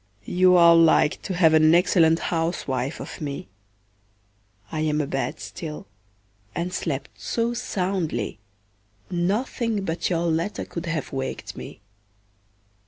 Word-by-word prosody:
You 180 0 +4
are 170 -1 +8
like 165 -2 +4
to 190 - -4
have 165 -3 +5
an 155 +1 +6
excellent 165 -2 +4 0.2
housewife 155 -5 -2
of - - -8
me; 140 -7 -5 1.2
I 155 - -3
am 155 -1 +1
abed 140 -2 -2
still, 155 -3 -7 0.7
and 175 +1 -2
slept 140 -7 -3
so 235 0 -1
soundly, 180 - -2 0.7
nothing 205 +4 -1
but 165 0 -1
your 170 -1 0
letter 165 +4 -1
could 170 0 -6
have 165 -3 -3
waked 135 0 -4
me. - - -9
165 Hz, 120 wpm, -24 LUFS, 155-180 Hz, 1.2 s, are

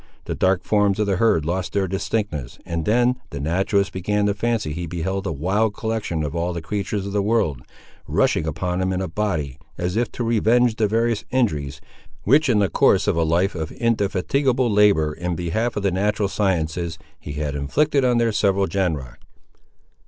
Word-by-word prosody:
The - - -3
dark 95 -1 +1
forms 105 -2 +2
of 105 - +1
the 100 -2 0
herd 95 -8 +2
lost 90 +2 -2
their 100 -1 +1
distinctness, 90 - -3
and 85 -3 -3
then 120 +3 +3
the 70 - -6
naturalist 95 +6 0
began 105 +3 0
to 100 - +2
fancy 105 -6 -1
he 85 +1 -4
beheld 95 +4 -3
a - - -1
wild 100 +8 0
collection 110 -8 -2
of 75 +2 -4
all 85 +1 -1
the 85 - -3
creatures 100 +2 -3
of 100 - -5
the 105 - +2
world, 100 - 0 0.5
rushing 80 - +1
upon 90 +4 -2
him 95 0 0
in 90 - -1
a 95 - -2
body, 80 -8 -2 0.2
as 90 +2 -2
if 120 +1 0
to 120 - -3
revenge 115 +1 +2
the 110 - +2
various 115 0 0
injuries, 75 - -1 0.4
which 145 +6 +4
in 115 - +3
the 100 -1 +3
course 80 - +3
of - - +2
a 85 - +1
life 85 +5 +1
of 80 -3 -4
indefatigable 120 +4 +1
labour 100 -7 +4
in 90 +2 -3
behalf 100 +8 -1
of 105 - -2
the 100 - +2
natural 100 +2 0
sciences, 85 -4 -1 0.2
he 75 - -7
had 75 -1 -3
inflicted 140 - +1
on 125 -1 +3
their 115 -1 +2
several 100 -2 +2
genera. 80 -11 -2
95 Hz, 190 wpm, -22 LUFS, 85-110 Hz, 0.5 s, which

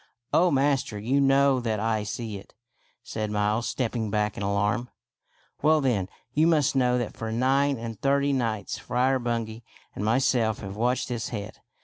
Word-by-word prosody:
" 120 0 -45
Oh, 180 +2 +5
master, 135 -6 +1
you 125 +7 +1
know 135 -1 +4
that 110 -3 -1
I 110 0 0
see 105 0 -5
it," - - -18 0.5
said 110 -1 -4
Miles, 105 +2 0
stepping 115 -3 -2
back 105 0 0
in - - -6
alarm. 100 +4 0 0.4
" - - -38
Well, 155 +1 +4
then, 115 -10 0 0.2
you 155 +2 +4
must 155 -4 +3
kiiow 125 -2 +3
that 120 -3 -3
for 110 0 -4
nine 135 +4 +2
and 115 -2 -7
thirty 140 +1 +2
nights 115 -6 -2
Friar 130 +2 +1
Bungay 115 -2 -3 0.3
and 100 - -5
myself 115 -1 +2
have 95 -2 -6
watched 120 +4 0
this 120 -2 -3
head. 105 -3 -6
120 Hz, 175 wpm, -26 LUFS, 110-135 Hz, 0.5 s, Oh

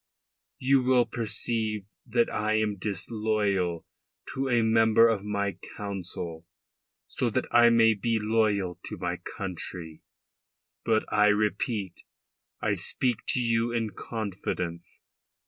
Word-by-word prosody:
You 135 +1 +3
will 125 -1 +4
perceive 110 -2 -2 0.2
that 120 0 +2
I 110 0 -1
am 110 -1 +1
disloyal 100 -3 -1 0.5
to 135 0 -1
a 120 -2 +3
member 110 0 +5
of 110 -4 0
my 100 -1 -2 0.2
Council 90 -4 -5 0.6
so - - -1
that - - -1
I 120 0 +7
may 115 -1 +5
be 115 +2 0
loyal 105 -5 +1
to - - -6
my - - -2 0.2
country. 85 -3 -6 0.8
But 110 -1 +2
I 105 0 +5
repeat, 105 -2 0 0.7
I - - +1
speak 125 -4 0
to - - +1
you 115 -1 +1
in 115 -2 -1
confidence. 90 -6 -5
110 Hz, 120 wpm, -28 LUFS, 100-115 Hz, 0.8 s, I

